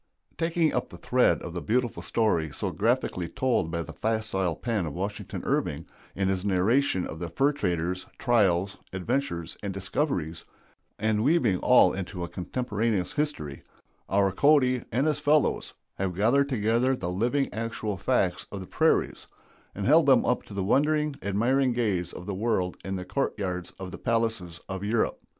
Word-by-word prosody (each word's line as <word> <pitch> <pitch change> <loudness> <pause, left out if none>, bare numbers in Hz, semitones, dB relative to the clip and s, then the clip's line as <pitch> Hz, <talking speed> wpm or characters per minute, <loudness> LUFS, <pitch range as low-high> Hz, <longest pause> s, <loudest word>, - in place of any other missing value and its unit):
Taking 165 -1 +1
up - - -1
the - - -11
thread - - +2
of 85 - -6
the 90 - -4
beautiful 120 +2 0
story 85 -9 +1
so - - -3
graphically 85 -2 0
told 125 -10 0
by 85 0 -2
the - - -9
facile 110 -6 -1
pen 110 -5 -2
of 75 - -6
Washington 100 +3 -4
Irving 75 +3 -1 0.3
in 95 -1 0
his 95 -1 0
narration 100 +2 +2
of 80 - -7
the 85 -1 -4
fur 135 - +2
traders' 90 - -2
trials, 100 -6 +2
adventures, 90 - -2
and 100 - -3
discoveries, 95 - -2 0.5
and 110 0 +1
weaving 125 - +3
all - - +5
into 95 -1 -5
a - - -3
contemporaneous 105 +1 -2
history, 110 - -2 0.5
our 100 0 +3
Cody 130 +1 +4
and 130 +5 +1
his 150 -2 +1
fellows 150 0 +1 0.2
have 95 -2 -1
gathered 130 +8 +3
together 120 +2 +2
the 90 -7 -4
living 120 +9 0
actual 110 -1 -3
facts 90 - 0
of 100 - -5
the 95 - -7
prairies, - - +1 0.5
and 100 - -3
held 155 +2 +5
them 130 -3 +5
up 125 - +1
to 100 - -10
the 100 - -1
wondering, 150 +6 +2
admiring 120 +6 +2
gaze 100 -8 0
of 90 - -9
the 100 - -3
world 95 -3 0
in 95 0 -3
the 90 -1 -5
court 135 +6 -1
yards 90 -3 -3
of 95 -1 -7
the - - -8
palaces 110 -7 -1
of 95 0 -5
Europe. 110 +2 0
105 Hz, 170 wpm, -27 LUFS, 90-125 Hz, 0.5 s, all